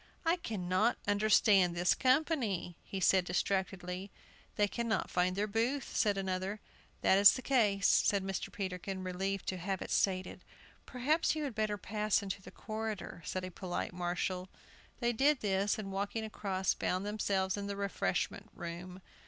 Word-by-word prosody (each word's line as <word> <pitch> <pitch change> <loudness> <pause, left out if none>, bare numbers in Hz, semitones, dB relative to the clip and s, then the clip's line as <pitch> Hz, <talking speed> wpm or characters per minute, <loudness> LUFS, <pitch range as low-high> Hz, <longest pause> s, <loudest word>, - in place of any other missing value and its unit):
"I 330 +2 +3
cannot 210 - 0
understand 205 -3 +4
this 175 +1 +4
company," 255 - +1
he 195 - -5
said, 190 0 +4
distractedly. 185 +1 -2 0.5
"They 205 - +3
cannot 230 +1 -1
find 180 +1 +1
their 205 +2 +1
booth," 230 +6 -1
said 205 -3 +2
another. 190 +2 -2 0.4
"That 190 - +5
is 200 - +9
the 255 - -5
case," 210 -7 +3
said 200 -2 +3
Mr. 195 -1 -3
Peterkin, 190 -2 -4
relieved 190 +1 -2
to 185 - -3
have 190 +2 -2
it - - -6
stated. 185 -1 0 0.4
"Perhaps 295 +7 +1
you 310 - -2
had 275 -4 -3
better 215 -1 -1
pass 210 0 0
into 195 0 -4
the - - -11
corridor," 215 -5 -5
said 185 0 -3
a 185 - -7
polite 180 0 -4
marshal. 180 +1 -2 0.5
They 240 -1 +1
did 275 +4 +3
this, 200 0 +1
and, 200 -3 -5
walking 200 +3 -2
across, 195 -3 -1
found 185 +2 -1
themselves 195 -2 0
in 200 -1 -4
the 200 - -3
refreshment 200 0 -2
room. 180 +2 -7
200 Hz, 160 wpm, -33 LUFS, 185-215 Hz, 0.5 s, is